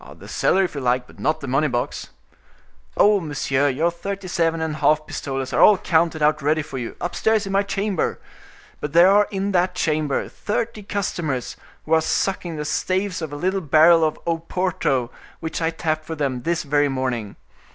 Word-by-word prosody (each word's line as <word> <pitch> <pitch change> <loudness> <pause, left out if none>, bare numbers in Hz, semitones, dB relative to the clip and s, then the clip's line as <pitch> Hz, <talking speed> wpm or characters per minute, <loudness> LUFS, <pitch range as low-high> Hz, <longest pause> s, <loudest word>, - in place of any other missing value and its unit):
"The - - -13
cellar, 195 - +2
if 185 - -2
you 140 - -4
like, 125 0 +1
but - - -18
not 155 - 0
the 140 - -6
money 135 +4 +2
box." 120 -3 -3 0.9
"Oh, 205 0 +5
monsieur, 145 -3 0
your 155 +6 +1
thirty 195 +3 -6
seven 165 -2 0
and 160 -1 -2
a - - -6
half 155 0 +3
pistoles 135 -3 -4
are - - +2
all 210 - +7
counted 160 -2 +1
out 150 +1 +3
ready 155 +2 +1
for 135 -3 -6
you, 120 - -6
upstairs 215 +4 0
in 195 - -5
my 195 +1 +3
chamber; 200 -2 -2 0.6
but 150 -1 -5
there 175 +3 +7
are 205 +1 +4
in 195 0 -2
that 180 -1 +1
chamber 155 -4 0
thirty 220 +1 -3
customers, 175 -10 -3 0.3
who 160 - -1
are 160 - +5
sucking 175 0 -1
the 150 -1 -4
staves 185 +4 -1
of 160 -2 -5
a - - -5
little 185 +5 -1
barrel 160 +2 +5
of 155 -1 0
Oporto 165 -6 -1 0.3
which 160 +1 -4
I 160 - +2
tapped 155 -1 -2
for 160 - -5
them 135 -5 -2
this 170 +5 -1
very 145 0 +2
morning. 130 -6 -3
160 Hz, 195 wpm, -22 LUFS, 145-185 Hz, 0.9 s, all